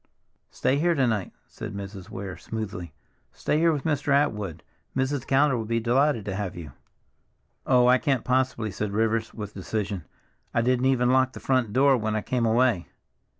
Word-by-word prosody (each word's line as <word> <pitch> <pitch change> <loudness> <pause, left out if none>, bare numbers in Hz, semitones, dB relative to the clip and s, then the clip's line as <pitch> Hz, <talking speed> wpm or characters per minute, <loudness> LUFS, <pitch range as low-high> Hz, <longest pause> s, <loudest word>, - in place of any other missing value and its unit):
"Stay 135 - 0
here 170 +2 +2
to 135 -3 +3
night," 110 -6 -1
said - - -8
Mrs. 100 -2 -7
Weir 95 -1 -6
smoothly. 100 -7 -6 0.4
"Stay 150 - -1
here 165 0 +4
with 145 -3 -2
Mr. 145 -2 0
Atwood; 105 - 0 0.3
Mrs. 135 0 -1
Callender 135 0 +3
will 115 - -2
be 115 +1 0
delighted 120 0 +2
to 100 - -3
have 95 -2 -3
you." 80 -5 -8 1.0
"Oh, 125 -2 +5
I 125 +1 +5
can't, 135 -3 0
possibly," 125 -4 0
said 100 +1 -3
Rivers 115 +1 0
with 105 -2 -7
decision. 100 -3 -3 0.5
"I 115 - +3
didn't 125 +1 +2
even 125 -2 +3
lock 130 0 +3
the - - -8
front 130 -5 +1
door 135 +3 +4
when 110 -1 -1
I 110 - 0
came 120 -3 0
away. 115 -5 +2
115 Hz, 180 wpm, -26 LUFS, 105-130 Hz, 1.0 s, Oh